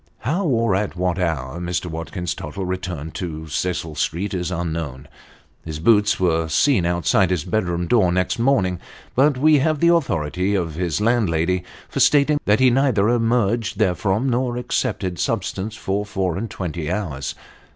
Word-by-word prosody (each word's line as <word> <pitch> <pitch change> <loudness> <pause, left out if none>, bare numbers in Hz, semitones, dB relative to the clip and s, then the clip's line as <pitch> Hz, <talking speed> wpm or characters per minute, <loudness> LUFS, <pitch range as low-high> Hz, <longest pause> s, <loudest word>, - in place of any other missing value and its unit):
How, 165 - -1
or 115 -6 +2
at 95 -1 -1
what 90 0 -1
hour, 80 -3 -2
Mr. 90 0 -2
Watkins 85 +1 -4
Tottle 95 +4 -6
returned 90 -4 -4
to 80 -3 -5
Cecil 80 0 -2
Street 85 +7 -2
is 90 -2 -2
unknown. 80 -6 -4 0.6
His 80 -2 -5
boots 105 +5 +3
were 80 -3 +1
seen 90 - +2
outside 85 +2 +2
his 90 -5 0
bedroom 90 -5 -1
door 95 -3 +3
next 90 +4 0
morning; 105 -9 +2 0.3
but 140 +1 +3
we 150 +2 +5
have 155 +2 +1
the 170 +2 +5
authority 90 - 0
of 85 -5 -1
his 85 -1 -2
landlady 90 -6 +1 0.2
for - - -4
stating 145 0 +4
that 105 +1 +3
he 130 -1 +5
neither 120 -5 +2
emerged 115 -2 +1
therefrom 100 +3 +1
nor 125 -1 0
accepted 90 -7 -2
sustenance 105 +8 -2
for 100 -1 -2
four 95 -4 -2
and 110 +4 -4
twenty 85 -4 -4
hours. 85 -9 -3
95 Hz, 160 wpm, -21 LUFS, 85-115 Hz, 0.6 s, we